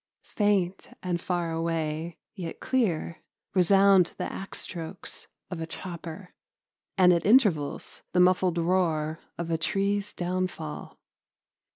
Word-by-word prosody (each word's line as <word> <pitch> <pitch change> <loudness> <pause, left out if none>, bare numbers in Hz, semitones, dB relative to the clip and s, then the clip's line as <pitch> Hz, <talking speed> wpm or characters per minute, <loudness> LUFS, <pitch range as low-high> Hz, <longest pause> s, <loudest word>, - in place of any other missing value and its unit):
Faint 195 -3 0
and 175 -2 -1
far 175 -2 -1
away, 165 0 -2 0.2
yet 175 -5 -6
clear, 210 -11 0 0.3
resound 195 0 +5
the - - -2
axe 195 - -6
strokes 170 +1 -6 0.2
of 170 -2 -4
a 160 - -3
chopper, 175 +1 -7 0.6
and 180 -1 +7
at 170 - +1
intervals 200 - +2
the 180 - +2
muffled 180 -1 +4
roar 165 -3 +1 0.2
of 170 -1 -3
a 165 - +1
tree's 200 +4 0
downfall. 180 -3 -4
180 Hz, 115 wpm, -28 LUFS, 165-190 Hz, 0.6 s, and